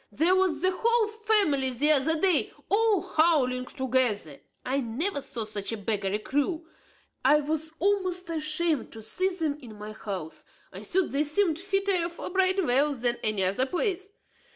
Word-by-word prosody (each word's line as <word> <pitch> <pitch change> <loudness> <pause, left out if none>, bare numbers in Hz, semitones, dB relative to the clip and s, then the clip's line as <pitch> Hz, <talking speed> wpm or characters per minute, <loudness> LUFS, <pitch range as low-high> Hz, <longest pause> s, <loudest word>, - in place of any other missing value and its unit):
Here 330 +6 +4
was 370 -5 +1
the 370 - +4
whole 465 +1 +2
family 410 -12 +1
here 295 +4 +3
the 290 +5 0
other 320 - -2
day, 370 -5 +2 0.2
all 425 -2 +3
howling 260 -6 +2
together. 250 - -1 0.3
I 265 +2 0
never 280 - -2
saw 245 -4 -4
such 210 -1 -3
a 225 - -3
beggarly 205 -1 -1
crew; 290 - -2 0.6
I 295 +3 +5
was 315 +1 -3
almost 370 -1 0
ashamed 310 -1 -1
to 220 -1 -9
see 370 - +1
them 320 -6 -3
in 225 -5 -11
my 210 +1 -7
house. 195 -7 -7 0.3
I - - -8
thought 375 -1 0
they 280 - +1
seemed 315 +2 +1
fitter 390 -2 0
for 340 +1 -7
Bridewell 350 -7 +2
than 240 -1 0
any 215 -3 0
other 200 +8 +1
place. 380 - -1
305 Hz, 165 wpm, -27 LUFS, 250-370 Hz, 0.6 s, I